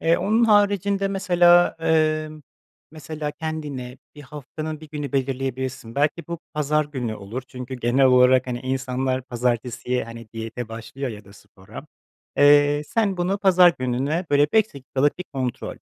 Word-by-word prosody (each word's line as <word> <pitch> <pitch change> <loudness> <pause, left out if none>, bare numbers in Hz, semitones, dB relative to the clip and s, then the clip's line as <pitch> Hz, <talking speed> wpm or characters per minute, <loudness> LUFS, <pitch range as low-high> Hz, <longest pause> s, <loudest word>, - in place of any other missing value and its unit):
Eee, 165 +1 +3
onun 215 +5 +2
haricinde 200 -2 +2
mesela, 175 -2 +4
emm, 155 -1 0 0.5
mesela 155 -1 -6
kendine 145 -6 -6 0.2
bir 145 - -11
haftanın 155 +2 -7
1 155 - -12
günü 145 -2 -5
belirleyebilirsin. 130 -2 -3
Belki 150 +3 0
bu 170 0 -4 0.2
pazar 150 0 +1
günü 130 -6 -4
olur 110 +5 -7
çünkü 125 0 -7
genel 125 +2 +2
olarak, 125 0 +5
hani, 120 -1 -4
insanlar 130 0 -2
pazartesiye, 125 0 -2
hani, 115 -1 -10
diyete 115 +1 -6
başlıyor 115 +4 -6
ya 105 -2 -10
da 100 - -16
spora. 100 -1 -13 0.5
Eee, 145 0 +5
sen 205 -4 0
bunu 180 +3 -1
pazar 185 -3 +5
gününe, 135 +7 -1
böyle, 145 0 +4
5 220 -6 +2
dakikalık 140 +3 -1
bir 180 - -5
kontrol. 130 -3 -4
140 Hz, 145 wpm, -23 LUFS, 125-160 Hz, 0.5 s, olarak